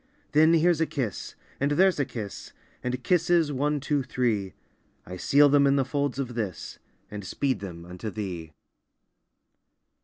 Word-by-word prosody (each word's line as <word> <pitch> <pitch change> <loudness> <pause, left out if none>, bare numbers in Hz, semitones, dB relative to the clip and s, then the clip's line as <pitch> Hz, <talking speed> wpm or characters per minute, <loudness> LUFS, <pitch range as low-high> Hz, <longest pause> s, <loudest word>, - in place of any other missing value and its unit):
Then 160 +2 +5
here's 165 0 +3
a 160 - +2
kiss! 120 - -4 0.2
and 140 +1 +1
there's 185 +1 +3
a 145 - +2
kiss! 115 -6 -7 0.3
And 125 0 -3
kisses, 170 -3 +2
one, 145 +2 0
two, 145 +1 0
three! 115 -7 -1 0.5
I 90 - -7
seal 145 +10 +5
them 140 0 +4
in 140 - +3
the 135 -2 +2
folds 140 -1 -1
of 130 -3 -3
this, 105 -7 -5 0.3
And 105 -1 -6
speed 130 +8 -1
them 85 -4 -8
unto 90 +5 -6
thee! 90 -7 -5
135 Hz, 155 wpm, -26 LUFS, 105-145 Hz, 0.5 s, Then